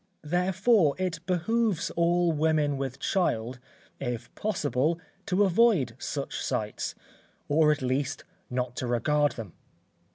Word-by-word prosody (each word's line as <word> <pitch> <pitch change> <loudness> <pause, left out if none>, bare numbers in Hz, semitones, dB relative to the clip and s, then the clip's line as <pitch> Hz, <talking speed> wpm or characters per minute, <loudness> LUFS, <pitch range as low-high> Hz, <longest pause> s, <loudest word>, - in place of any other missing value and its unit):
Therefore 180 - +3
it 180 -3 -2
behoves 195 +1 +1
all 170 0 +2
women 155 -2 +2
with 135 -2 -3
child, 125 - 0 0.4
if 120 -2 -4
possible, 160 - 0 0.3
to 190 +2 +3
avoid 190 - +3
such 140 -1 -4
sights, 105 -1 -2 0.5
or 150 +1 +4
at 145 -3 -1
least, 135 +2 -1 0.3
not 125 0 -2
to 125 - -2
regard 145 +5 +2
them. 110 -7 -8
150 Hz, 120 wpm, -28 LUFS, 130-180 Hz, 0.5 s, or